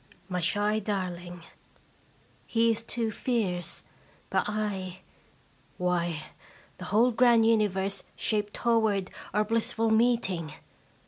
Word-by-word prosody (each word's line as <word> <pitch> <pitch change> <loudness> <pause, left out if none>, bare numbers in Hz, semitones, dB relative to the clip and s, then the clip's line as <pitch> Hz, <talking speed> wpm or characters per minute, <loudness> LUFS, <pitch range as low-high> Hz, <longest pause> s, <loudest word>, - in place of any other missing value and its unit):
My 180 -1 -2
shy 205 +4 +2
darling! 180 -4 -4 1.0
He 230 0 +3
is 225 0 -3
too 230 -1 -2
fierce, 185 -8 -2 0.5
but - - +1
/ 195 -3 -7
why, 175 -3 0 0.6
the 185 - -6
whole 225 +7 +3
grand 235 -1 +5
universe 200 -3 +1
shaped 210 -1 -1
toward 220 -5 +1 0.2
ottr 210 0 +1
blissful 225 0 +1
meeting 220 -9 +2
210 Hz, 105 wpm, -28 LUFS, 185-225 Hz, 1.0 s, grand